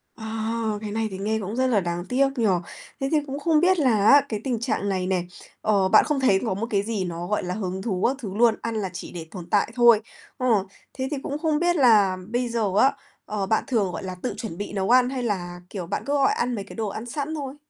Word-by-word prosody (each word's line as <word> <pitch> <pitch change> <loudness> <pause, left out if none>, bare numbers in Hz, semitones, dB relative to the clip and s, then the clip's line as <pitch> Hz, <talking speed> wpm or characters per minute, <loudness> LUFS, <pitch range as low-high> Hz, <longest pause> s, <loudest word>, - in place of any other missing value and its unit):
À, 220 0 -4 0.3
cái 210 -1 -5
này 220 +1 -1
thì 190 - -5
nghe 215 +3 -1
cũng 205 +1 -5
rất 260 +1 +2
là 230 -5 +3
đáng 175 -1 -3
tiếc 270 +2 +3
nhỉ. 230 - +1 0.5
Thế 270 -1 -1
thì 315 - +4
cũng 275 +1 -4
không 310 +1 +3
biết 365 +2 +3
là 225 -8 +3
á 285 +3 +8
cái 215 - -2
tình 245 -4 -1
trạng 225 -4 -1
này 185 -2 -1
nè, 185 -2 0 0.4
ờ, 200 -3 +2
bạn 215 - +6
không 300 -2 0
thấy 225 -8 +4
có 220 - 0
một 210 +5 -3
cái 200 -3 +1
gì 215 -2 -2
nó, 170 0 -5
gọi 210 +2 -1
là, 180 0 -3
hứng 190 -2 -4
thú 190 -3 -2
các 260 - 0
thứ 200 -7 -6
luôn, 230 -1 +5
ăn 230 -1 -3
là 205 -3 -2
chỉ - - -7
để 165 -2 -7
tồn 175 -3 -9
tại 205 +2 +2
thôi. 235 -3 +6 0.4
Ờ, 255 -2 -1 0.5
thế 260 0 -3
thì 295 - -1
cũng 285 - -3
không 310 -2 +1
biết 350 +1 +2
là 215 - +5
bây 240 +1 -1
giờ 225 -4 0
á, 270 - +5 0.3
ờ, 210 -2 -2
bạn 220 +3 +1
thường, 210 -7 +1
gọi - - -6
là, 185 -1 -5
tự 250 - -1
chuẩn 200 -7 -6
bị 205 - -5
nấu 195 -1 -1
ăn 250 0 +5
hay 260 -2 -3
là, 180 -5 -3
kiểu, 185 -5 -6
bạn - - -3
cứ 280 - -1
gọi 275 -1 +3
ăn 245 0 -1
mấy 200 - -4
cái 195 - -12
đồ 225 -2 -2
ăn 215 +3 -5
sẵn 285 +5 -4
thôi? 275 -3 -5
220 Hz, 270 wpm, -24 LUFS, 195-255 Hz, 0.5 s, á